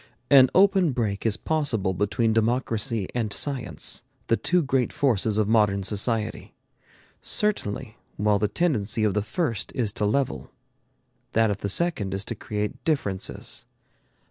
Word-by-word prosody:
An 130 Hz, -2 st, +8 dB
open 190 Hz, -5 st, +4 dB
break 110 Hz, -3 st, -1 dB
is 110 Hz, -, +1 dB
possible 130 Hz, -12 st, 0 dB
between 110 Hz, +4 st, +1 dB
democracy 115 Hz, -1 st, 0 dB
and 115 Hz, -4 st, -1 dB
science, 135 Hz, +1 st, -1 dB, 0.3 s
the 115 Hz, -, +5 dB
two 175 Hz, +7 st, +1 dB
great 135 Hz, -3 st, 0 dB
forces 110 Hz, -6 st, +1 dB
of 110 Hz, -2 st, +2 dB
modern 105 Hz, -3 st, +3 dB
society. 110 Hz, +2 st, -1 dB, 0.7 s
Certainly 130 Hz, -, -2 dB, 0.2 s
while 105 Hz, 0 st, +2 dB
the 105 Hz, -, +2 dB
tendency 110 Hz, -, 0 dB
of 105 Hz, -2 st, +2 dB
the 105 Hz, -, +1 dB
first 120 Hz, -, -2 dB
is 120 Hz, -6 st, 0 dB
to 105 Hz, 0 st, -2 dB
level, 135 Hz, +5 st, -1 dB, 0.8 s
that 110 Hz, -1 st, +3 dB
of 100 Hz, -, -3 dB
the 100 Hz, -, -2 dB
second 105 Hz, -, +1 dB
is 95 Hz, +1 st, -4 dB
to -, -, -3 dB
create 105 Hz, +3 st, -4 dB
differences. 105 Hz, -, -2 dB
110 Hz, 145 wpm, -25 LUFS, 105-135 Hz, 0.8 s, An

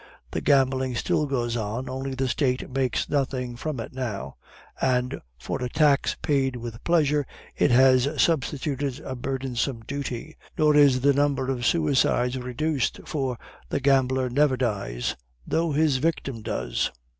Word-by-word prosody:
The -, -, -2 dB
gambling 130 Hz, -2 st, +2 dB
still 150 Hz, +5 st, 0 dB
goes 120 Hz, -4 st, -1 dB
on, 115 Hz, +3 st, -3 dB
only 130 Hz, +1 st, -4 dB
the 130 Hz, 0 st, 0 dB
State 125 Hz, +1 st, 0 dB
makes 130 Hz, -1 st, 0 dB
nothing 130 Hz, -3 st, -1 dB
from 140 Hz, +1 st, -4 dB
it 115 Hz, -, -6 dB
now; 105 Hz, -, -4 dB, 0.5 s
and 125 Hz, -1 st, 0 dB, 0.2 s
for 60 Hz, -, -4 dB
a 125 Hz, -, -2 dB
tax 145 Hz, 0 st, +2 dB
paid 135 Hz, -3 st, +1 dB
with 115 Hz, -1 st, -7 dB
pleasure, 150 Hz, -4 st, +2 dB, 0.3 s
it -, -, +3 dB
has 130 Hz, +1 st, +5 dB
substituted 140 Hz, -3 st, 0 dB
a 130 Hz, -, -5 dB
burdensome 130 Hz, -2 st, -2 dB
duty. 140 Hz, +2 st, -5 dB, 0.2 s
Nor 150 Hz, -1 st, +4 dB
is 140 Hz, -3 st, +5 dB
the 140 Hz, +2 st, +4 dB
number 140 Hz, -2 st, +1 dB
of 120 Hz, -2 st, -1 dB
suicides 135 Hz, -5 st, +2 dB
reduced, 130 Hz, +3 st, -1 dB
for 135 Hz, -5 st, -2 dB, 0.3 s
the -, -, 0 dB
gambler 130 Hz, -1 st, +2 dB
never 135 Hz, +1 st, +2 dB
dies, 100 Hz, -, -2 dB, 0.3 s
though 165 Hz, 0 st, 0 dB
his 150 Hz, -2 st, +2 dB
victim 135 Hz, -5 st, -2 dB
does." 105 Hz, -, -1 dB
130 Hz, 145 wpm, -25 LUFS, 125-140 Hz, 0.5 s, has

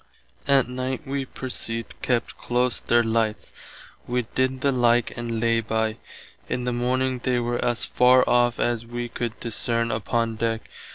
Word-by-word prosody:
Att 135 Hz, -3 st, +4 dB
night 130 Hz, +1 st, -4 dB
wee 135 Hz, 0 st, -2 dB
perceived 115 Hz, -3 st, -4 dB
kept 120 Hz, -2 st, 0 dB
close 125 Hz, 0 st, 0 dB
their 120 Hz, 0 st, +3 dB
lights. 110 Hz, -1 st, -1 dB, 0.5 s
Wee 125 Hz, -1 st, 0 dB
did 130 Hz, 0 st, 0 dB
the 140 Hz, -, +3 dB
like 120 Hz, -2 st, +2 dB
and 115 Hz, -1 st, -3 dB
lay 115 Hz, 0 st, +2 dB
by. 110 Hz, 0 st, -1 dB, 0.5 s
In 125 Hz, -, -1 dB
the 125 Hz, 0 st, -1 dB
morning 130 Hz, +1 st, 0 dB
they 125 Hz, 0 st, 0 dB
were 120 Hz, 0 st, -1 dB
as 120 Hz, -1 st, +1 dB
far 125 Hz, +1 st, +5 dB
off 120 Hz, -1 st, +3 dB
as 120 Hz, -1 st, 0 dB
[wee] 120 Hz, +1 st, -5 dB
could 115 Hz, -1 st, -4 dB
discerne 115 Hz, 0 st, +1 dB
upon 115 Hz, +1 st, -1 dB
deck. 115 Hz, 0 st, -2 dB
120 Hz, 160 wpm, -24 LUFS, 115-125 Hz, 0.5 s, far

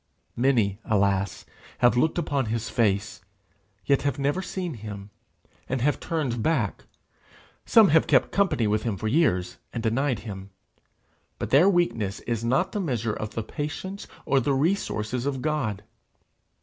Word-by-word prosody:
Many, 115 Hz, -6 st, +2 dB
alas! 100 Hz, -2 st, 0 dB, 0.3 s
have 120 Hz, 0 st, +4 dB
looked 155 Hz, +8 st, +2 dB
upon 145 Hz, -7 st, 0 dB
his 115 Hz, +1 st, -3 dB
face, 105 Hz, -3 st, 0 dB, 0.6 s
yet 140 Hz, -1 st, +3 dB
have 140 Hz, -3 st, -1 dB
never 145 Hz, +6 st, 0 dB
seen 180 Hz, -3 st, -4 dB
him, 105 Hz, -3 st, -8 dB, 0.6 s
and 130 Hz, -, 0 dB
have 145 Hz, +3 st, +1 dB
turned 145 Hz, -9 st, -2 dB
back; 125 Hz, -8 st, 0 dB, 0.8 s
some 220 Hz, -4 st, +7 dB
have 160 Hz, +1 st, +4 dB
kept -, -, +3 dB
company 195 Hz, -, +2 dB
with 105 Hz, 0 st, +1 dB
him 110 Hz, -4 st, -2 dB
for 110 Hz, -, -3 dB
years, 90 Hz, -, +1 dB
and 115 Hz, -, -4 dB
denied 125 Hz, +3 st, 0 dB
him; 100 Hz, -3 st, -8 dB, 0.9 s
but -, -, -5 dB
their 155 Hz, +8 st, +6 dB
weakness 115 Hz, -, 0 dB
is 115 Hz, -2 st, -3 dB
not 135 Hz, +10 st, +1 dB
the 210 Hz, -, -2 dB
measure 115 Hz, -, -1 dB
of 110 Hz, 0 st, -6 dB
the 115 Hz, -, -2 dB
patience 160 Hz, -, -5 dB, 0.2 s
or 135 Hz, -, +3 dB
the 135 Hz, +2 st, +1 dB
resources 130 Hz, -, -1 dB
of 135 Hz, -3 st, -2 dB
God. 130 Hz, -10 st, -1 dB
120 Hz, 150 wpm, -26 LUFS, 110-150 Hz, 0.9 s, some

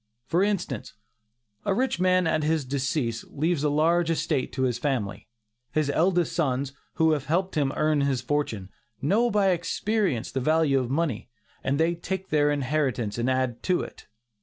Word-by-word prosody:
For 170 Hz, +6 st, +1 dB
instance, 190 Hz, -, -2 dB, 0.7 s
a 195 Hz, -, +1 dB
rich 255 Hz, -5 st, 0 dB
man 185 Hz, 0 st, +3 dB
at 155 Hz, -1 st, +1 dB
his 155 Hz, -1 st, 0 dB
decease, 130 Hz, -3 st, -1 dB
leaves 155 Hz, +1 st, -1 dB
a 150 Hz, -, +3 dB
large 165 Hz, +3 st, +2 dB
estate 155 Hz, -4 st, 0 dB
to 130 Hz, -, -1 dB
his 125 Hz, -2 st, 0 dB
family. 105 Hz, -9 st, -2 dB, 0.5 s
His 155 Hz, -2 st, +1 dB
eldest 175 Hz, +1 st, +2 dB
sons, 140 Hz, -3 st, 0 dB, 0.2 s
who 160 Hz, -1 st, +3 dB
have 150 Hz, -2 st, -1 dB
helped 185 Hz, +5 st, 0 dB
him 145 Hz, -4 st, +1 dB
earn 155 Hz, -1 st, +2 dB
his 140 Hz, -2 st, +1 dB
fortune, 125 Hz, -8 st, -2 dB, 0.3 s
know 210 Hz, -, +2 dB
by 205 Hz, -3 st, +3 dB
experience 180 Hz, -, -1 dB
the 135 Hz, -, -1 dB
value 155 Hz, 0 st, +3 dB
of 125 Hz, -2 st, -3 dB
money, 140 Hz, -6 st, -1 dB, 0.3 s
and 140 Hz, +2 st, 0 dB
they 165 Hz, +1 st, +3 dB
take 190 Hz, +2 st, -5 dB
their 145 Hz, -1 st, +3 dB
inheritance 135 Hz, -6 st, -1 dB
and 120 Hz, +2 st, +1 dB
add 130 Hz, -2 st, 0 dB
to 180 Hz, -1 st, +1 dB
it. -, -, -9 dB
150 Hz, 170 wpm, -26 LUFS, 130-170 Hz, 0.7 s, man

